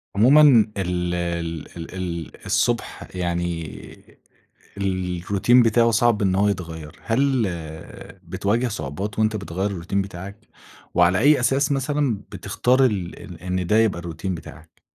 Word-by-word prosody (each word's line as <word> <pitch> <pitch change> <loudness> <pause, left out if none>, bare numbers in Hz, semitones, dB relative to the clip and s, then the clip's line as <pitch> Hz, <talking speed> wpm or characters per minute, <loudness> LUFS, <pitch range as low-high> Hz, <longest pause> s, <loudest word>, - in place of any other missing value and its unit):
عمومًا 130 +9 +6 0.4
ال 90 -1 -1
ال 85 -2 -3
ال 85 +2 -8
ال 85 -3 -6
الصبح - - -1
يعني، 85 -2 -5 0.6
الروتين 95 +5 +2
بتاعه 115 +1 +4
صعب 115 -1 +2
إنه 95 -1 +2
هو 105 +1 +3
يتغيّر. 80 -5 -5
هل 130 +1 +2 0.8
بتواجه 115 +5 0
صعوبات 100 +3 -5
وأنت 110 0 +2
بتغيّر 95 0 -3
الروتين 95 +2 -2
بتاعك؟ 95 +1 -8 0.6
وعلى 90 +1 +4
أي 145 +2 +5
أساس 135 +4 +2
مثلًا 140 -4 0
بتختار 125 +6 +1
ال 90 -5 -3
إن 90 0 -2
ده 105 +4 +3
يبقى 110 -6 +2
الروتين 85 +2 -4
بتاعك؟ 80 0 -12
95 Hz, 125 wpm, -23 LUFS, 85-115 Hz, 0.8 s, عمومًا